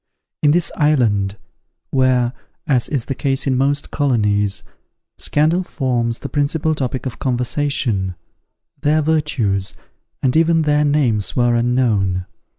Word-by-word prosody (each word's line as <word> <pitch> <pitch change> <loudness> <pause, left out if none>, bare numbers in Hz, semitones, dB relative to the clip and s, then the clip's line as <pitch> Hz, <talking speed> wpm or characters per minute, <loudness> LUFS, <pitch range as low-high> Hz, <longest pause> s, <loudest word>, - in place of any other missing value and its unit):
In 150 - +4
this 170 +3 +2
island, 110 - +2 0.5
where, 130 -2 +2 0.3
as 125 -4 +1
is 135 -6 -1
the - - -2
case 135 0 -1
in 135 -2 +1
most 140 +2 0
colonies, 105 -7 +1 0.6
scandal 155 +5 +2
forms 125 -8 -2
the - - -4
principal 155 +2 0
topic 130 -3 -3
of 130 - -5
conversation, 125 -6 -1 0.7
their 155 +1 +2
virtues, 125 -11 0 0.5
and 130 0 +2
even 165 0 +3
their 150 0 +2
names 130 -9 +1
were 120 -1 +3
unknown. 115 -7 +1
130 Hz, 125 wpm, -19 LUFS, 115-150 Hz, 0.7 s, In